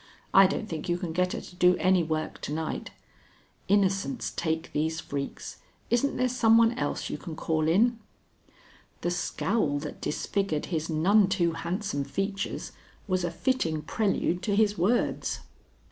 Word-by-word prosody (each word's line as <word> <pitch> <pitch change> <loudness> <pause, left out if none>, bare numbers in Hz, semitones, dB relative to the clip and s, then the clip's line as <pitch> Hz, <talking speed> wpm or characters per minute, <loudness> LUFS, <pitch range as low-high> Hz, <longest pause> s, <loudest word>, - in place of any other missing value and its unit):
I 195 0 +8
don't 205 +3 -3
think 160 -3 -5
you 175 - +2
can 175 -3 -4
get 180 +1 +1
her - - -4
to 180 - -12
do 180 0 +4
any 185 -1 +3
work 155 -1 -3
to - - -4
night. 160 +1 -3 0.8
Innocents 200 +5 +1
take 160 -1 -2
these 160 +2 0
freaks. 140 -3 -5 0.3
Isn't 245 +4 +2
there 255 - +2
some 230 -2 +4
one 230 0 +5
else 245 - -3
you - - -4
can 165 -4 -7
call 155 -1 0
in?" 225 +8 +3 1.0
The 175 - 0
scowl 175 -3 0
that 150 - -7
disfigured 175 -1 -1
his 160 0 -1
none 190 +6 +4
too 175 -4 +2
handsome 170 0 -2
features 195 +8 -3 0.4
was 185 -2 0
a 175 - 0
fitting 165 - -1
prelude 180 -1 0
to 200 +2 0
his 210 -1 +3
words. 210 +7 0
180 Hz, 160 wpm, -28 LUFS, 160-205 Hz, 1.0 s, I